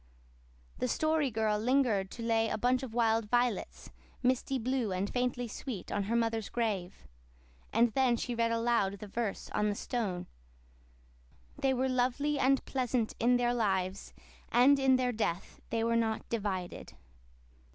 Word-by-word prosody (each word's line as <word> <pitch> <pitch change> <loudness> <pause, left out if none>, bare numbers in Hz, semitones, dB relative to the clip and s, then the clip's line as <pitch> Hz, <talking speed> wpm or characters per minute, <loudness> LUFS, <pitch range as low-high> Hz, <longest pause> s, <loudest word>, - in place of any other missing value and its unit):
The 255 - 0
Story 310 +2 +1
Girl 215 -2 0
lingered 230 -5 +2
to 230 - -8
lay 225 -1 +2
a - - -1
bunch 250 +3 +2
of 245 -4 -7
wild 225 -2 +2
violets, 245 -3 -1 0.3
misty 260 +1 +1
blue 250 -3 -1
and 185 +2 -1
faintly 245 +1 -1
sweet, 225 -3 -6
on 200 -1 -1
her 225 +4 -1
mother's 225 -2 0
grave; 200 - -3 0.7
and 230 0 +3
then 255 -2 +3
she 245 - -3
read 230 0 +1
aloud 230 -4 +1
the 210 - -8
verse 215 0 -4
on 210 0 +1
the 205 - -1
stone. 200 -7 -3 1.3
"'They 270 -2 +2
were 260 +1 +1
lovely 260 +3 0
and 270 0 +2
pleasant 250 -3 -1
in 245 +2 +4
their 240 0 +1
lives 190 -5 -1 0.4
and 270 +4 +5
in 265 -1 +4
their 255 -1 +1
death 200 -6 -3
they 225 0 0
were 230 0 +1
not 225 -1 0
divided. 195 -5 -3
230 Hz, 155 wpm, -31 LUFS, 215-250 Hz, 1.3 s, and